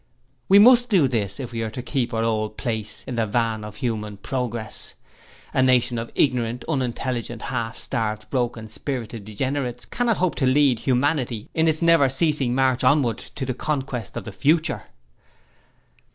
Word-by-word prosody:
'We 195 Hz, -, +8 dB
must 245 Hz, +3 st, +7 dB
do 180 Hz, -10 st, +4 dB
this 110 Hz, -5 st, -2 dB
if 125 Hz, -3 st, -5 dB
we 115 Hz, -1 st, -3 dB
are 110 Hz, -, -2 dB
to 120 Hz, +3 st, -6 dB
keep 125 Hz, -4 st, -1 dB
our 115 Hz, -1 st, 0 dB
old 110 Hz, -1 st, -1 dB
place 110 Hz, -4 st, -3 dB
in 130 Hz, -, -5 dB
the 115 Hz, -1 st, +1 dB
van 110 Hz, 0 st, 0 dB
of 105 Hz, -1 st, -8 dB
human 105 Hz, -4 st, -3 dB
progress. 120 Hz, -1 st, -3 dB, 0.6 s
A -, -, +3 dB
nation 125 Hz, -2 st, +3 dB
of 115 Hz, -, -6 dB
ignorant, 125 Hz, -3 st, +1 dB
unintelligent, 125 Hz, -5 st, -2 dB
half 115 Hz, -2 st, -2 dB
starved, 110 Hz, -1 st, -3 dB
broken 120 Hz, -3 st, -1 dB
spirited 115 Hz, -2 st, -5 dB
degenerates 125 Hz, +3 st, -3 dB
cannot 240 Hz, -3 st, 0 dB
hope 185 Hz, -2 st, +1 dB
to 130 Hz, -, +2 dB
lead 130 Hz, -2 st, +4 dB
humanity 125 Hz, -3 st, 0 dB
in 160 Hz, 0 st, +2 dB
its 160 Hz, +1 st, +1 dB
never 165 Hz, -5 st, +5 dB
ceasing 135 Hz, -3 st, +2 dB
march 130 Hz, -1 st, +2 dB
onward 125 Hz, -4 st, +3 dB
to 135 Hz, -, -6 dB
the 130 Hz, -, -2 dB
conquest 130 Hz, -5 st, -3 dB
of -, -, -4 dB
the 110 Hz, -, -7 dB
future. 155 Hz, -, +1 dB
125 Hz, 165 wpm, -23 LUFS, 115-140 Hz, 0.6 s, We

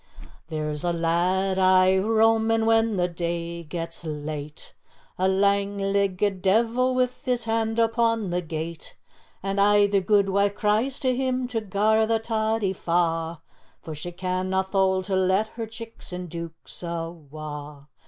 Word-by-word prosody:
"There's 150 Hz, -2 st, -3 dB
a 175 Hz, -, +1 dB
lad 180 Hz, +3 st, +1 dB
aye 185 Hz, 0 st, +5 dB
roamin' 225 Hz, +1 st, +3 dB
when 225 Hz, -1 st, +3 dB
the 180 Hz, -1 st, +1 dB
day 170 Hz, 0 st, -4 dB
gets 165 Hz, +1 st, -5 dB
late, 150 Hz, -1 st, -6 dB, 0.5 s
A 185 Hz, -, +3 dB
lang 200 Hz, +1 st, +2 dB
leggit 195 Hz, -1 st, 0 dB
deevil 235 Hz, +6 st, +2 dB
wi' 255 Hz, 0 st, +3 dB, 0.2 s
his 250 Hz, -2 st, 0 dB
hand 225 Hz, 0 st, 0 dB
upon 230 Hz, -3 st, +1 dB
the 180 Hz, 0 st, 0 dB
gate, 160 Hz, 0 st, -6 dB, 0.5 s
And 195 Hz, 0 st, 0 dB
aye 205 Hz, 0 st, +5 dB
the 200 Hz, -1 st, +2 dB
guidwife 200 Hz, 0 st, +2 dB
cries 220 Hz, +7 st, +1 dB
to 255 Hz, -2 st, +1 dB
him 255 Hz, -1 st, -1 dB
to 230 Hz, -3 st, -1 dB
gar 215 Hz, +2 st, +2 dB
the 225 Hz, 0 st, +2 dB
toddie 220 Hz, -3 st, 0 dB
fa', 165 Hz, -2 st, -1 dB, 0.4 s
For 160 Hz, -, -6 dB
she 155 Hz, +4 st, -6 dB
canna 185 Hz, +1 st, -1 dB
thole 190 Hz, -1 st, +1 dB
to 195 Hz, 0 st, -2 dB
let 190 Hz, +3 st, +2 dB
her 225 Hz, 0 st, -6 dB
chicks 225 Hz, -1 st, -9 dB
an' 180 Hz, 0 st, -6 dB
deuks 165 Hz, 0 st, -8 dB
awa'. 155 Hz, -4 st, -7 dB
190 Hz, 145 wpm, -25 LUFS, 170-220 Hz, 0.5 s, aye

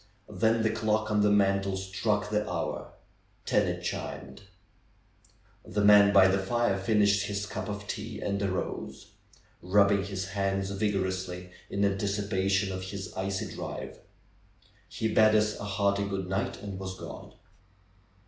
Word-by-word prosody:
Then 110 Hz, +3 st, +2 dB
the 110 Hz, -, +2 dB
clock 110 Hz, -1 st, 0 dB
on 105 Hz, -1 st, +3 dB
the 105 Hz, -, +4 dB
mantle 100 Hz, -1 st, +2 dB
struck 105 Hz, +2 st, -1 dB
the 105 Hz, 0 st, 0 dB
hour. 85 Hz, -2 st, -4 dB, 0.5 s
Ten -, -, +2 dB
it -, -, -3 dB
chimed. 65 Hz, 0 st, -5 dB, 1.2 s
The 105 Hz, -, -2 dB
nrian 100 Hz, 0 st, +7 dB
by 95 Hz, -2 st, +7 dB
the 95 Hz, +1 st, +2 dB
fire 110 Hz, 0 st, 0 dB
finished 100 Hz, 0 st, +2 dB
his 100 Hz, 0 st, -2 dB
cup 105 Hz, -, -5 dB
of 105 Hz, 0 st, -5 dB
tea 110 Hz, +3 st, -5 dB
and 100 Hz, 0 st, -2 dB
arose, 95 Hz, -2 st, -4 dB, 0.5 s
rubbing 100 Hz, +1 st, +3 dB
his 95 Hz, -1 st, -4 dB
hands 95 Hz, -1 st, -1 dB
vigorously 95 Hz, -3 st, -2 dB, 0.2 s
in 100 Hz, +1 st, +1 dB
anticipation 100 Hz, -1 st, 0 dB
of 95 Hz, 0 st, -5 dB
his 95 Hz, -1 st, -6 dB
icy 95 Hz, 0 st, -3 dB
drive. -, -, -6 dB, 0.9 s
He 110 Hz, -, -2 dB
bade 110 Hz, 0 st, +5 dB
us 105 Hz, 0 st, +2 dB
a 100 Hz, -, -5 dB
hearty 100 Hz, 0 st, +1 dB
'^Good 100 Hz, -1 st, -2 dB
night!" 95 Hz, +2 st, -3 dB
and 100 Hz, -2 st, -6 dB
was 95 Hz, -1 st, -6 dB
gone. -, -, -9 dB
100 Hz, 145 wpm, -29 LUFS, 95-105 Hz, 1.2 s, nrian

